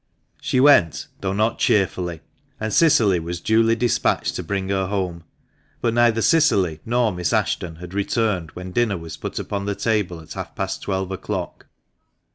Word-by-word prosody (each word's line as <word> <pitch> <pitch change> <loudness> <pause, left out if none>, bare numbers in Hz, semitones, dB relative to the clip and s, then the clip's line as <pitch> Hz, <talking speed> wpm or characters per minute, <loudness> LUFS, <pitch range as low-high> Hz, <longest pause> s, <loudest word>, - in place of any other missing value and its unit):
She 130 - 0
went, 130 - +5
though 95 - -2
not 110 +3 0
cheerfully, 90 -4 +1 0.4
and 110 -1 -3
Cicily 110 - +4
was 85 +1 -5
duly 115 +3 +3
despatched 120 0 0
to - - -3
bring 95 -1 -3
her 95 -1 0
home; 90 -4 -3 0.5
but 115 - 0
neither 115 -1 +3
Cicily 100 - +3
nor 120 -1 +2
Miss 90 -4 -2
Ashton 85 -2 -1
had 90 +2 -10
returned 100 -4 0
when 90 0 -7
dinner 110 -2 +1
was 80 -1 -8
put - - -6
upon 100 -1 -3
the 100 - -1
table 105 -7 -1
at 80 - -10
half - - -7
past - - -3
twelve 95 -1 -2
o'clock. 95 - -5
100 Hz, 165 wpm, -22 LUFS, 90-115 Hz, 0.5 s, went